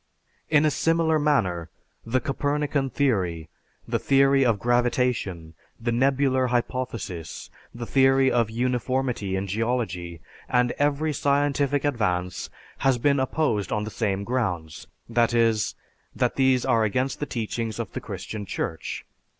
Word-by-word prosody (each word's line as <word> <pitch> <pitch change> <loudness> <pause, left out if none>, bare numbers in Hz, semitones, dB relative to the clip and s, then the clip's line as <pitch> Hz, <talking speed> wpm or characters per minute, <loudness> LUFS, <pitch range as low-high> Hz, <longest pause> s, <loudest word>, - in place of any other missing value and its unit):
In 155 -1 +4
a 155 - +3
similar 165 0 +2
manner, 95 - +1 0.3
the 120 +3 0
Copernican 145 0 -1
theory, 90 - 0 0.4
the - - 0
theory 135 0 +4
of 115 -4 +3
gravitation, 120 -8 0 0.3
the 120 +1 -1
nebular 130 +1 +2
hypothesis, 120 -8 -3 0.2
the 120 0 -6
theory 135 +1 +4
of 115 -2 +2
uniformity 125 -3 -1
in 95 +1 -2
geology, 100 -5 -2 0.3
and 125 -1 +2
every 145 +2 +1
scientific 140 0 +1
advance 90 -9 -1 0.3
has 135 -2 +3
been 140 +3 +2
opposed 130 - 0
on 105 0 0
the 110 - -5
same 100 -3 -1
grounds; 90 -10 -3 0.2
that 115 0 +2
is, 115 -2 +2 0.4
that - - 0
these 130 -2 +3
are 115 -4 +3
against 125 +5 0
the 145 - -3
teachings 115 -1 -3
of - - -4
the - - -5
Christian 110 -2 -6
Church. 80 - -4
125 Hz, 135 wpm, -25 LUFS, 105-135 Hz, 0.4 s, In